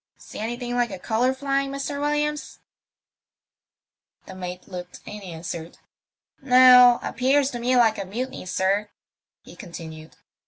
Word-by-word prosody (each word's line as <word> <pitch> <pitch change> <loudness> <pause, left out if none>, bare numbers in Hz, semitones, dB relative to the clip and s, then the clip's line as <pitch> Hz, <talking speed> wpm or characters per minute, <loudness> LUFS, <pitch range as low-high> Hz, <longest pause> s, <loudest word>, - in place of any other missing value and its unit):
See - - -11
anything 240 +2 -4
like 245 -1 +1
a 190 - -6
colour 230 +7 0
flying, 275 +1 -1
Mr. 275 +1 -4
WiUiams? 295 +1 -2 0.8
" - - -51
The - - -10
mate 180 -1 -7
looked 180 -2 -9
and 210 0 -8
answered, 170 -2 -7 0.4
" - - -70 0.2
No. 250 -2 +7
Appears 270 +3 +1
to 240 - -5
me 250 +2 +1
like 225 -3 +3
a 195 - -4
mutiny, 240 +1 -6
sir," 195 +3 0 0.5
he - - -14
continued. 160 -6 -10
240 Hz, 145 wpm, -24 LUFS, 185-265 Hz, 0.8 s, No